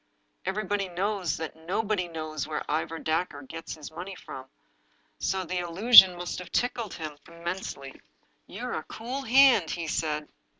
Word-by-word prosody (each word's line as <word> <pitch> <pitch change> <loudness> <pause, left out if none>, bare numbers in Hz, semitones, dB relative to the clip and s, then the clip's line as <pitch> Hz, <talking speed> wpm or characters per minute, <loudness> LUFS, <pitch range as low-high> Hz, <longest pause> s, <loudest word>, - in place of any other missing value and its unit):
Everybody 200 -1 -1
knows 185 -2 -1
that 160 -1 -5
nobody 185 +3 -1
knows 155 -3 -5
where 155 -1 -3
Ivor 160 +2 -1
Dacre 160 -3 -2
gets 165 +5 -7
his 155 -2 -10
money 180 +4 -7
from, 130 -6 -9 0.7
so 190 +1 -1
the 180 +1 -2
allusion 185 +2 +8
must 175 +1 -4
have 180 - -9
tickled 235 -5 -1
him 155 -2 -7
immensely. 170 -5 -6 0.2
" - - -41
You're - - -5
a - - -3
cool 250 +5 -5
hand," 260 - +5
he 170 -1 -3
said. 150 -1 -2
175 Hz, 155 wpm, -28 LUFS, 160-195 Hz, 0.7 s, allusion